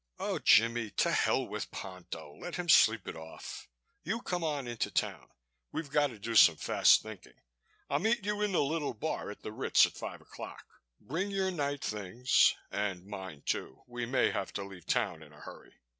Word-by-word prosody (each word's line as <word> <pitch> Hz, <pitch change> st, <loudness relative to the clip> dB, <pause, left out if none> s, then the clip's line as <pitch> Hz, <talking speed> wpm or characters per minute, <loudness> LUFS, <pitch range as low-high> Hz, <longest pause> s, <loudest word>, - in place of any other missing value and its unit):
"Oh, -, -, -2 dB
Jimmie, 115 Hz, 0 st, +4 dB
to -, -, +3 dB
hell -, -, +2 dB
with -, -, -5 dB
Ponto. 85 Hz, -5 st, -8 dB
Let 175 Hz, 0 st, -6 dB
him 180 Hz, -1 st, -4 dB
sleep 110 Hz, -, +5 dB
it -, -, -5 dB
off. 80 Hz, 0 st, -9 dB, 0.3 s
You 220 Hz, +8 st, -3 dB
come 180 Hz, -2 st, -2 dB
on 145 Hz, -5 st, -2 dB
in 120 Hz, -1 st, -5 dB
to -, -, 0 dB
town. -, -, -2 dB, 0.4 s
We've 150 Hz, -4 st, -5 dB
got 145 Hz, 0 st, +3 dB
to 120 Hz, -5 st, -10 dB
do 115 Hz, +3 st, -4 dB
some 110 Hz, -, +8 dB
fast -, -, +4 dB
thinking. 110 Hz, -4 st, -11 dB, 0.5 s
I'll 140 Hz, -, +1 dB
meet 220 Hz, +3 st, +1 dB
you 210 Hz, 0 st, -1 dB
in 210 Hz, -1 st, +1 dB
the 175 Hz, -, +3 dB
Little 150 Hz, -2 st, -2 dB
Bar 155 Hz, +1 st, -3 dB
at 105 Hz, -, -10 dB
the -, -, -5 dB
Ritz 110 Hz, -, +4 dB
at -, -, -6 dB
five -, -, -7 dB
o'clock. -, -, -10 dB, 0.3 s
Bring 165 Hz, -, -3 dB
your 190 Hz, -1 st, 0 dB
night 145 Hz, -4 st, -2 dB
things, 105 Hz, +4 st, +2 dB, 0.2 s
and 95 Hz, -3 st, -2 dB
mine, 95 Hz, -7 st, -8 dB
too. 65 Hz, -, -3 dB
We 120 Hz, -1 st, -5 dB
may 130 Hz, +2 st, +2 dB
have 95 Hz, -, -3 dB
to 100 Hz, -, -3 dB
leave 95 Hz, -3 st, -11 dB
town 85 Hz, -5 st, 0 dB
in 75 Hz, -1 st, -14 dB
a 75 Hz, -, -16 dB
hurry. -, -, -12 dB
115 Hz, 200 wpm, -31 LUFS, 100-160 Hz, 0.5 s, some